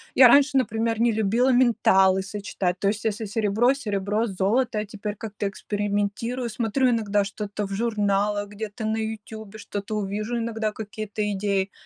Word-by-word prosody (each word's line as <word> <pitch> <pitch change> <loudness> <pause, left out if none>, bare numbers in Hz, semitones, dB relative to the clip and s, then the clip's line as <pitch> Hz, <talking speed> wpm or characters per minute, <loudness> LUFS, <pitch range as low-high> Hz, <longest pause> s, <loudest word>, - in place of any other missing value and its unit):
Я 255 - +9
раньше, 280 +2 +5
например, 225 -2 0
не 235 0 +4
любила 220 +4 +2
металлы 195 -6 +4
сочетать, 195 -2 -3
то 195 - 0
есть 210 +2 -3
если 220 +1 -1
серебро- 220 +4 +2
серебро, 210 -3 -1
золото- 195 - -6
золото, 220 +3 +1
я 210 - -2
теперь 210 0 -5
как-то 205 -1 -4
экспериментирую, 205 +5 -2
смотрю 235 +4 +1
иногда 210 -4 +1
что-то 205 +1 -4
в 195 - -6
журналах, 205 -2 0
где-то 215 +2 -6
на 220 +1 0
"Ютюбе", 220 -1 -6
что-то 205 0 -5
увижу 210 +3 -2
иногда, 225 -2 -2
какие-то 215 0 -6
идеи 200 -1 -1
210 Hz, 155 wpm, -25 LUFS, 200-230 Hz, -, Я